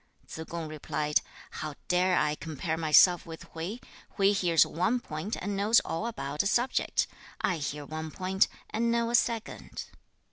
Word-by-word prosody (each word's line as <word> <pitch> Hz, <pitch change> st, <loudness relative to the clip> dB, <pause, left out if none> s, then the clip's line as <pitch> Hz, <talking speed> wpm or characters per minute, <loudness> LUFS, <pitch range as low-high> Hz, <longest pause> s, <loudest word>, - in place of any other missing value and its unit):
2. 160 Hz, -, -7 dB
Tsze -, -, -20 dB
kung 170 Hz, -2 st, -4 dB
replied, 150 Hz, 0 st, 0 dB, 0.3 s
'How 155 Hz, -2 st, -5 dB
dare 180 Hz, 0 st, +3 dB
I 150 Hz, 0 st, +2 dB
compare 160 Hz, +1 st, -3 dB
myself 165 Hz, +3 st, +5 dB
with 160 Hz, -1 st, -8 dB
Hui? 170 Hz, +7 st, -4 dB, 0.4 s
Hui 195 Hz, -1 st, +5 dB
hears 175 Hz, -5 st, +4 dB
one 195 Hz, +9 st, 0 dB
point 175 Hz, 0 st, -4 dB
and 205 Hz, +2 st, -3 dB
knows 210 Hz, +4 st, +5 dB
all 190 Hz, +8 st, -3 dB
about 145 Hz, -9 st, -2 dB
a 200 Hz, -, 0 dB
subject; 240 Hz, +5 st, +1 dB, 0.3 s
I 180 Hz, -, +1 dB
hear 145 Hz, 0 st, -4 dB
one 155 Hz, +1 st, -5 dB
point, 190 Hz, +4 st, +1 dB, 0.2 s
and 235 Hz, +1 st, +1 dB
know 235 Hz, 0 st, +1 dB
a -, -, -4 dB
second.' 230 Hz, -2 st, -1 dB
175 Hz, 170 wpm, -29 LUFS, 155-205 Hz, 0.4 s, myself